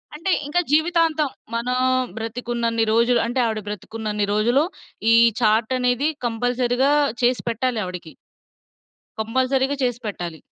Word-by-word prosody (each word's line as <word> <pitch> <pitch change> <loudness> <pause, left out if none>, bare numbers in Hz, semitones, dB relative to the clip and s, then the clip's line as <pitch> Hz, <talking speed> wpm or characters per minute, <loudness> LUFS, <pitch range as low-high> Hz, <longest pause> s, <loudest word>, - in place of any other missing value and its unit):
అంటే, 365 +5 -2 0.2
ఇంకా 355 +4 +1
జీవితాంతం 315 -2 +2 0.3
మనం 250 +2 -1 0.4
బ్రతికున్నన్ని 230 0 -2
రోజులు 235 +2 +3
అంటే, 245 +2 -2
ఆవిడ 220 -1 -1
బ్రతికున్నన్ని 210 +1 -3
రోజులు 240 +7 +3 0.5
ఈ - - +7 0.3
చార్టనేది 245 +5 +2 0.2
కంపల్సరీగా 245 +3 +1 0.3
చేసి 245 +1 +2
పెట్టాలి 235 0 -1
ఆవిడకి. 180 -3 -7 1.1
కంపల్సరీగా 260 +4 0
చేసి 245 -1 0
పెట్టాలి. 175 -6 -6
240 Hz, 110 wpm, -22 LUFS, 220-260 Hz, 1.1 s, ఈ